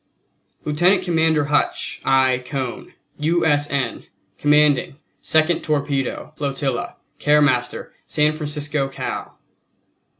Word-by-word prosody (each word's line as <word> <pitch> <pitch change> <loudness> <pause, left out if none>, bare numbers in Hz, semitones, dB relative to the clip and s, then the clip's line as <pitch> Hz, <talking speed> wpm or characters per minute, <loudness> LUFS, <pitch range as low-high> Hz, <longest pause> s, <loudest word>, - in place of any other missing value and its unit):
LIEUTENANT 175 +6 +3
COMMANDER 160 -3 +2
HUTCH. 145 +1 -1
I. 130 -1 +3
CONE, 130 -1 -5 0.2
U. 165 +3 +1
S. 145 -1 +2
N., 135 -4 -2 0.3
Commanding 150 -2 +3 0.3
Second 160 +1 +2
Torpedo 145 -1 -2
Flotilla, 140 -3 -3 0.2
Care 150 0 +4
Postmaster, 125 -4 0
San 150 0 +2
Francisco, 150 -2 -2
Cal. 135 - -6
145 Hz, 100 wpm, -21 LUFS, 135-155 Hz, 0.3 s, Care